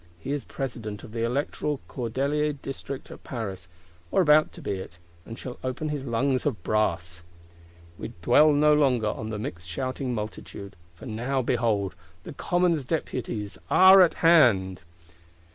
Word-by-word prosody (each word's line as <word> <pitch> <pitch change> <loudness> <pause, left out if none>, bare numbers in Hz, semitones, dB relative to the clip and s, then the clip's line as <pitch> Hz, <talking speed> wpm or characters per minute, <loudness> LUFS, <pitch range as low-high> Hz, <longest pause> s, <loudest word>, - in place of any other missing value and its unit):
He 85 - -6
is 145 -1 -2
President 115 -6 -6
of 110 - -11
the 115 0 -3
electoral 140 +3 -1
Cordeliers 140 +5 -1
District 135 0 -7
at - - -12
Paris, 95 -8 -6 0.4
or - - +1
about 155 -1 +5
to - - -11
be - - -4
it; 85 -2 -10 0.3
and 115 - -8
shall 125 -1 -8
open 130 +4 -3
his 145 -2 -4
lungs 130 +3 0
of 120 - -2
brass. 85 -5 -1 0.8
We - - -6
dwell 150 - +6
no 150 +1 +4
longer 130 -7 +2
on 110 +1 -5
the 110 - -4
mixed 85 -5 -6
shouting 130 - -3
Multitude: 105 -3 -7 0.2
for - - -12
now, 125 +4 -2
behold, 110 -7 0 0.3
the - - -8
Commons 175 -2 +1
Deputies 115 - -4
are 190 +1 +8
at 175 - +4
hand! 105 - +5
125 Hz, 155 wpm, -26 LUFS, 105-145 Hz, 0.8 s, are